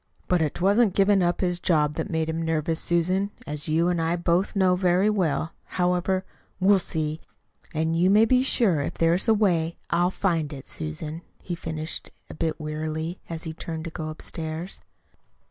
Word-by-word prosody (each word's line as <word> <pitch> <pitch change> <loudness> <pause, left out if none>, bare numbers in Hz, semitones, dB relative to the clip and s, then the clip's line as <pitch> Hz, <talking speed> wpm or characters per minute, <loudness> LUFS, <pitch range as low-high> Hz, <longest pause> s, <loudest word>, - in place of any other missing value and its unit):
"But 180 -2 +2
'twasn't 200 +2 +3
giving 195 0 +4
up 175 0 +1
his 180 -2 +1
job 150 -4 +2
that's 180 - -3
made 160 -2 0
him 160 +1 -2
nervous, 160 0 0
Susan, 185 +4 +1 0.2
as 150 +1 -4
you 165 +2 +3
and 175 -2 +1
I 165 +1 +1
both 175 +4 +1
know 185 -2 +4
very 185 +3 +3
well. 165 -5 0 0.3
However, 180 +1 +1 0.3
we'll 195 +1 +5
see. 155 -2 -3 0.5
And 160 +1 +1
you 175 +3 +3
may 210 +3 +6
be 250 +2 +4
sure 215 - +2
if - - -3
there 165 0 +3
is 180 - 0
a 225 - +5
way 170 -6 +1
I'll 175 +1 +3
find 165 -6 -1
it, 135 -2 -8
Susan," 150 - -5 0.2
he 180 - -4
finished 160 -1 -4 0.2
a - - -8
bit 160 0 -2
wearily, 155 +2 -4
as 165 -1 -4
he 160 - -5
turned 160 0 -5
to 165 - -5
go 155 -1 -5
upstairs. 160 +2 -5
170 Hz, 180 wpm, -25 LUFS, 160-185 Hz, 0.5 s, may